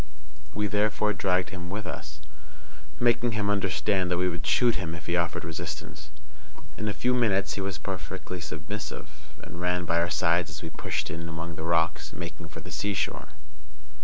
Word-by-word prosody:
We 105 +1 +2
therefore 105 +1 +2
dragged 90 -2 +2
him 90 -1 -5
with 105 +2 -3
us, 75 -4 -6 0.8
making 120 -1 +4
him 105 -1 +2
understand 95 -1 +2
that 90 - +2
we 90 +1 +3
would 85 -3 -3
shoot 120 +9 +5
him 90 -4 -2
if 85 -1 -9
he 85 - +1
offered 85 -2 +1
resistance. 75 -1 -5 0.7
In 110 - -2
a - - +2
few 125 +4 +2
minutes 105 -6 +3
he 100 - -2
was 95 -3 -1
perfectly 90 +1 -4
submissive, 80 +1 -5 0.3
and 85 +2 -7
ran 90 0 +2
by 85 0 +3
our 85 +1 +2
sides 85 +2 +3
as 75 +1 -7
we 80 - -5
pushed - - -2
in 85 +1 -4
among 85 +1 -4
the 80 - -6
rocks, 80 -2 +2
making 85 -1 -6
for - - -8
the - - -9
seashore. 100 -5 0
90 Hz, 180 wpm, -29 LUFS, 80-100 Hz, 0.8 s, shoot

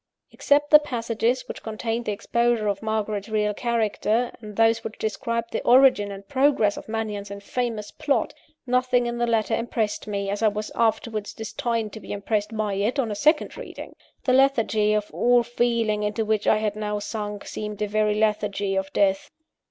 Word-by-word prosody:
Except 290 +1 +2
the 300 - +10
passages 240 -2 -1
which - - -7
contained 225 +1 -3
the - - -1
exposure 235 +2 0
of 200 -1 -1
Margaret's 215 -1 -2
real 210 -1 +1
character, 230 +1 0
and 210 -2 -9
those 225 +1 +3
which 220 - -6
described 230 +1 -2
the - - -2
origin 250 -5 +5
and 195 0 -9
progress 265 -7 +2
of - - -9
Mannion's 210 -2 -3
infamous 210 +2 -4
plot, 285 - 0 0.3
nothing 250 -1 +2
in 240 0 -3
the 240 - +1
letter 225 -1 +1
impressed 225 -3 -2
me, 200 -1 -2
as 205 - -3
I 220 - +4
was 210 0 -2
afterwards 220 -2 -1
destined 220 0 -3
to 220 - -7
be - - -7
impressed 210 +2 -2
by 210 -2 -1
it, 205 +7 0
on 240 -6 0
a - - -2
second 300 +8 +2
reading. - - -9 0.3
The 255 - +2
lethargy 225 -6 +3
of 210 -1 -1
all 245 0 +4
feeling 235 -3 0
into 210 +2 -1
which 215 -1 0
I 215 - +5
had 215 -1 -1
now 210 -1 -2
sunk, 205 -1 -5
seemed 210 -1 -6
a - - -1
very 210 0 +1
lethargy 210 -2 0
of 190 0 -2
death. 195 -1 +1
220 Hz, 185 wpm, -24 LUFS, 210-235 Hz, 0.3 s, the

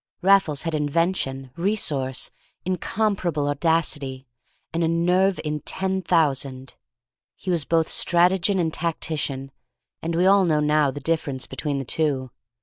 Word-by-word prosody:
Raffles 190 -7 +4
had 165 -1 -2
invention, 145 -3 -1
resource, 155 -9 -1 0.3
incomparable 185 -4 -1
audacity, 145 -3 0 0.5
and 165 +1 0
a - - +2
nerve 180 +3 +2
in 150 -1 -2
ten 190 +4 -2
thousand. 140 -6 0 0.6
He 185 - -4
was 165 -5 0
both 165 0 +2
strategian 180 +3 +2
and 160 -2 0
tactician, 150 -5 -3 0.5
and 165 +1 -2
we 175 +2 +3
all 195 0 +6
now 155 -3 +2
know 150 -1 +3
the 145 - -5
difference 140 -3 -1
between 145 -2 -3
the 135 - -3
two. 135 -3 0
160 Hz, 135 wpm, -24 LUFS, 140-180 Hz, 0.6 s, all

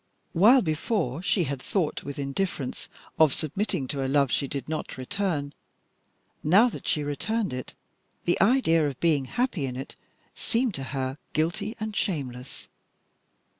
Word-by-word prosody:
While 230 +9 +7
before 160 - -1
she 190 -1 +2
had 140 -3 -3
thought 175 -1 -1
with 140 - -6
indifference 140 0 -3 0.3
of 155 -4 +6
submitting 165 -1 -2
to 140 -2 -1
a - - 0
love 140 -2 +3
she 140 - +1
did 140 0 -4
not 155 -3 -4
return, 145 0 -2 0.9
now 200 +11 +6
that - - -8
she 150 - +2
returned 195 - -1
it 130 0 -6 0.5
the 175 - +2
idea 190 - +4
of 135 -3 -5
being 155 -5 +2
happy 205 - -1
in 125 - -5
it 135 +2 -6 0.4
seemed 235 -1 0
to 135 -4 -4
her 130 +2 -2
guilty 175 +8 0
and 215 -1 -4
shameless. 135 -10 -3
155 Hz, 150 wpm, -27 LUFS, 140-200 Hz, 0.9 s, While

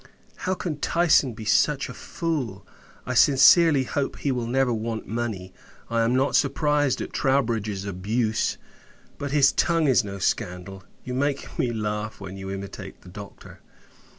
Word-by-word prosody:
How 185 - +1
can 160 -5 -4
Tyson 160 -7 +3
be 110 - -8
such 140 +6 +2
a - - -8
fool! 140 - -4 0.4
I 125 - -3
sincerely 140 +3 +6
hope, 140 +2 -3
he 140 - -1
will 120 -2 -2
never 130 0 +1
want 110 0 -4
money. 105 -5 -4 0.4
I 115 0 +2
am 115 +2 +2
not 135 +2 +1
surprised 145 -1 +1
at - - -6
Troubridge's 110 -7 0
abuse; 110 +4 -1 0.6
but, 145 - -3
his 140 -1 +4
tongue 165 -2 +1
is 130 -4 +4
no 100 -1 -6
scandal. 95 -1 -3 0.2
You 125 - -5
make 140 +2 -2
me 120 - +1
laugh, 105 -1 -3
when 95 -1 -8
you 95 0 -7
imitate 95 0 -7
the 90 - -14
Doctor! 100 +2 -11
120 Hz, 155 wpm, -25 LUFS, 100-140 Hz, 0.6 s, sincerely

